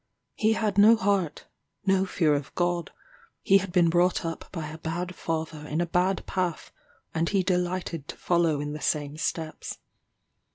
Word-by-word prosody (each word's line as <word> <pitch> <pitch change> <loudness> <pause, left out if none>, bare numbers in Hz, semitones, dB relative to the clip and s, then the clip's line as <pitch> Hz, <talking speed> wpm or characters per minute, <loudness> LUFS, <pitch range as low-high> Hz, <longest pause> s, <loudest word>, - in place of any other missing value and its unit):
He 220 0 +2
had 210 -3 0
no 220 +3 +8
heart 195 -6 0 0.4
no 190 0 +3
fear 160 -5 +2
of 145 -1 -3
God; 175 -2 0 0.5
he 195 0 +6
had 195 -1 -5
been 175 -1 +4
brought 175 +1 +2
up 165 0 -4
by 165 -4 -4
a 155 +1 -9
bad 175 +3 -3
father 160 -3 -4
in 155 +2 -2
a 175 - +2
bad 180 +2 +1
path, 180 -3 -2 0.4
and 165 +1 0
he 195 -2 +2
delighted 180 -4 -1
to - - -7
follow 170 -4 +2
in 145 0 -3
the 150 - -6
same 145 -1 -1
steps. 155 0 -4
175 Hz, 170 wpm, -27 LUFS, 160-185 Hz, 0.5 s, no